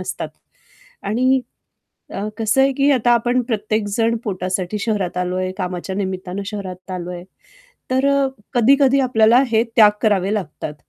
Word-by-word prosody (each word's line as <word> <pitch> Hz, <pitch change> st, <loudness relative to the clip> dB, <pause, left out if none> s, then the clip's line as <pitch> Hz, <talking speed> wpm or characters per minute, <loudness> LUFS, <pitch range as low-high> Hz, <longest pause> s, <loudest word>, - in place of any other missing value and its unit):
असतात -, -, -5 dB, 0.7 s
आणि 255 Hz, +5 st, +2 dB, 0.7 s
अ, 205 Hz, +2 st, -4 dB
कसं 225 Hz, +4 st, +2 dB
आहे, 275 Hz, 0 st, +3 dB
की 275 Hz, +2 st, +2 dB
आता 240 Hz, -2 st, +2 dB
आपण 245 Hz, +2 st, +2 dB
प्रत्येकजण 220 Hz, 0 st, -1 dB
पोटासाठी 185 Hz, 0 st, -3 dB
शहरात 205 Hz, -5 st, -2 dB
आलो 180 Hz, 0 st, -2 dB
आहे, 185 Hz, 0 st, -2 dB
कामाच्या 185 Hz, 0 st, -4 dB
निमित्तानं 190 Hz, 0 st, -4 dB
शहरात 190 Hz, -3 st, -7 dB
आलो 180 Hz, -1 st, -5 dB
आहे, 175 Hz, 0 st, -7 dB, 0.7 s
तर 260 Hz, +2 st, +2 dB
अ, 280 Hz, -1 st, +2 dB, 0.3 s
कधी-कधी 275 Hz, +3 st, +4 dB
आपल्याला 240 Hz, -1 st, +4 dB
हे 225 Hz, 0 st, +3 dB
त्याग 215 Hz, -3 st, +8 dB
करावे 205 Hz, -2 st, +2 dB
लागतात. 155 Hz, -6 st, -5 dB
215 Hz, 145 wpm, -20 LUFS, 185-245 Hz, 0.7 s, त्याग